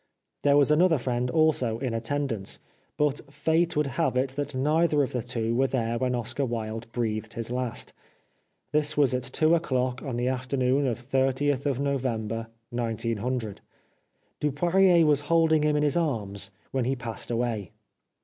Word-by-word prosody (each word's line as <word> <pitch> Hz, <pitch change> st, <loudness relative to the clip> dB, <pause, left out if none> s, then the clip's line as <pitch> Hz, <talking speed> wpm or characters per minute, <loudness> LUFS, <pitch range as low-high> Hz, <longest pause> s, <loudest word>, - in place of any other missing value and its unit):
There 145 Hz, 0 st, +4 dB
was 145 Hz, +1 st, +4 dB
another 165 Hz, +1 st, +4 dB
friend 125 Hz, -1 st, -1 dB
also 130 Hz, -6 st, +2 dB
in 125 Hz, -1 st, -3 dB
attendance. 115 Hz, -3 st, -2 dB, 0.4 s
But 145 Hz, -1 st, 0 dB
fate 165 Hz, +2 st, +1 dB
would 150 Hz, -, +3 dB
have 140 Hz, 0 st, 0 dB
it 130 Hz, +1 st, +1 dB
that 145 Hz, +1 st, -4 dB
neither 150 Hz, +2 st, +2 dB
of 130 Hz, -, -3 dB
the 125 Hz, -, -1 dB
two 115 Hz, -1 st, -2 dB
were 135 Hz, +3 st, +3 dB
there 115 Hz, -3 st, -1 dB
when 125 Hz, 0 st, 0 dB
Oscar 120 Hz, +3 st, -2 dB
Wilde 115 Hz, -2 st, -4 dB
breathed 110 Hz, -2 st, -2 dB
his 115 Hz, 0 st, -4 dB
last. 125 Hz, -1 st, -3 dB, 0.8 s
This 150 Hz, 0 st, +1 dB
was 140 Hz, -4 st, +4 dB
at 125 Hz, -, 0 dB
two 155 Hz, +5 st, +2 dB
o'clock 130 Hz, -6 st, 0 dB
on 130 Hz, -5 st, -4 dB
the 120 Hz, +1 st, 0 dB
afternoon 130 Hz, +1 st, +1 dB
of 120 Hz, -, -1 dB
30th 135 Hz, +2 st, 0 dB
November 115 Hz, -5 st, -2 dB, 0.2 s
1900. 115 Hz, -1 st, -2 dB, 0.8 s
Dupoirier 170 Hz, +4 st, +4 dB
was 145 Hz, -2 st, +3 dB
holding 165 Hz, -2 st, +4 dB
him 150 Hz, 0 st, +2 dB
in 150 Hz, -, +2 dB
his 145 Hz, -2 st, +2 dB
arms 105 Hz, -, -1 dB, 0.2 s
when 130 Hz, -2 st, 0 dB
he 135 Hz, +2 st, 0 dB
passed 115 Hz, -3 st, -6 dB
away. 115 Hz, -5 st, -1 dB
130 Hz, 160 wpm, -27 LUFS, 115-145 Hz, 0.8 s, There